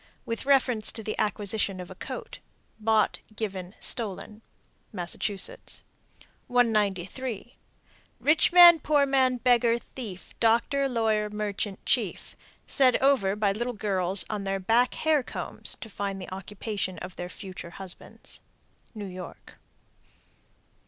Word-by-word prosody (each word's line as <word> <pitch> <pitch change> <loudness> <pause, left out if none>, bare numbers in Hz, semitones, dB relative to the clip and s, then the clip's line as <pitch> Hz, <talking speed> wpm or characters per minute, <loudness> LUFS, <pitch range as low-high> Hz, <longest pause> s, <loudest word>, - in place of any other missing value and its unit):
With 230 +3 -4
reference 255 -5 +3
to 225 - -7
the 215 - -3
acquisition 205 -1 0
of 180 - -8
a - - -6
coat: - - -7 0.4
Bought, 215 -1 +2 0.2
given, 195 -3 -5
stolen. 215 -1 -1 0.5
Massachusetts. 185 +3 -3 0.6
193. 220 0 0 0.6
"Rich 310 +4 +3
man, 345 -2 +9
poor 290 -1 +3
man, 260 -2 +2
beggar, 240 -1 +3
thief, 210 -8 -9
doctor, 240 +5 +2
lawyer, 220 -3 +1
merchant, 210 -1 -4
chief." - - 0 0.3
Said 260 -3 +4
over 260 -8 +3
by 210 -1 +1
little 240 +5 -2
girls 195 -3 +3
on 210 -2 -3
their 195 0 -1
back 230 +6 +2
hair 310 -2 +2
combs - - -4
to - - -6
find 200 -2 -4
the 185 0 -7
occupation 195 0 -4
of 185 - -8
their 175 0 -6
future 185 -3 -9
husbands. 185 +1 -8 0.6
_New 200 -3 -6
York. 180 -1 -10
215 Hz, 125 wpm, -27 LUFS, 195-245 Hz, 0.6 s, man